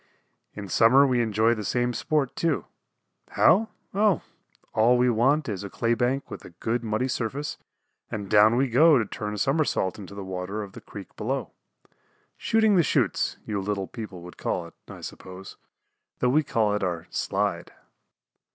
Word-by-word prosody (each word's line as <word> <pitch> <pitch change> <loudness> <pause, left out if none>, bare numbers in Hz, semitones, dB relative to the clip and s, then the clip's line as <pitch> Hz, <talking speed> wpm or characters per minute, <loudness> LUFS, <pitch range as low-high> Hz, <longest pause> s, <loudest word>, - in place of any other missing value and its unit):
In 100 -1 -6
summer 115 +9 +5
we 125 -3 +2
enjoy 110 0 +2
the 110 -2 -4
same 120 +3 0
sport, 140 +2 -1
too. 165 -4 0 0.7
How? 220 +4 +4 0.2
Oh, 200 -3 +2 0.5
all 115 +3 +4
we 125 0 +3
want 135 +6 +2
is 100 -3 -4
a 100 - -6
clay 115 +4 0
bank 125 +3 -1
with - - -7
a - - -11
good 115 +7 -3
muddy 110 +3 -1
surface, 130 +4 -3 0.5
and 105 -2 -5
down 105 +3 +5
we 135 +2 +2
go 145 +5 +5
to 115 - +1
turn 105 +1 -5
a - - -6
somersault 135 - 0
into 100 0 -10
the 100 - -6
water 95 +3 -4
of 100 - -10
the - - -11
creek - - -11
below. - - -3 0.8
"Shooting 220 -2 +2
the - - +6
chutes" 155 - 0
you 105 -2 -2
little 100 0 -2
people 105 -6 -8
would 90 - -11
call - - -2
it, - - -13 0.2
I - - -10
suppose, 95 +1 -9 0.6
though 125 - +1
we 150 +5 +4
call 110 -7 0
it 105 - -1
our 85 -3 -2
"slide." 100 -3 -2
115 Hz, 175 wpm, -26 LUFS, 100-135 Hz, 0.8 s, the